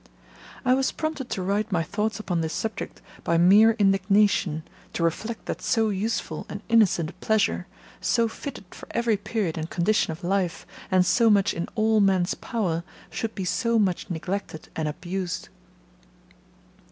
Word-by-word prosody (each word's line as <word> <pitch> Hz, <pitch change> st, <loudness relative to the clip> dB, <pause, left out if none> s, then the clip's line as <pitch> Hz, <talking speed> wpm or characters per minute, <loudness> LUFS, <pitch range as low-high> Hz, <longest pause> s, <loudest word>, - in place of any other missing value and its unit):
I 255 Hz, -, +5 dB
was 265 Hz, 0 st, +2 dB
prompted 310 Hz, -5 st, -3 dB
to 185 Hz, -, -2 dB
write 205 Hz, +3 st, 0 dB
my 170 Hz, -3 st, +1 dB
thoughts 210 Hz, +6 st, -2 dB
upon 175 Hz, -5 st, -1 dB
this 160 Hz, 0 st, -2 dB
subject 220 Hz, 0 st, -4 dB, 0.2 s
by 170 Hz, -, +2 dB
mere 205 Hz, +6 st, +7 dB
indignation, 195 Hz, -4 st, +2 dB, 0.3 s
to 170 Hz, -, -1 dB
reflect 215 Hz, +8 st, -2 dB
that -, -, -4 dB
so 225 Hz, -1 st, +2 dB
useful 210 Hz, +3 st, -2 dB
and -, -, -6 dB
innocent 200 Hz, -8 st, +3 dB
a -, -, -21 dB
pleasure, 220 Hz, -1 st, 0 dB, 0.3 s
so 230 Hz, -1 st, +2 dB
fitted 245 Hz, -1 st, -7 dB
for -, -, -11 dB
every 235 Hz, -2 st, +2 dB
period 200 Hz, -5 st, -2 dB
and 160 Hz, +1 st, -4 dB
condition 200 Hz, +4 st, +1 dB
of 160 Hz, +3 st, -6 dB
life, 180 Hz, -1 st, -1 dB, 0.2 s
and 185 Hz, -1 st, +4 dB
so 230 Hz, +5 st, +4 dB
much 205 Hz, -1 st, +4 dB
in 170 Hz, -, -3 dB
all 220 Hz, -1 st, +3 dB
men's 190 Hz, -3 st, +3 dB
power, 180 Hz, -8 st, -2 dB, 0.3 s
should 225 Hz, -1 st, -3 dB
be 190 Hz, -, -3 dB
so 230 Hz, +4 st, +1 dB
much 190 Hz, -5 st, 0 dB
neglected 180 Hz, -1 st, -4 dB
and 160 Hz, -1 st, -1 dB
abused. 180 Hz, +3 st, -4 dB
200 Hz, 160 wpm, -25 LUFS, 175-220 Hz, 0.3 s, mere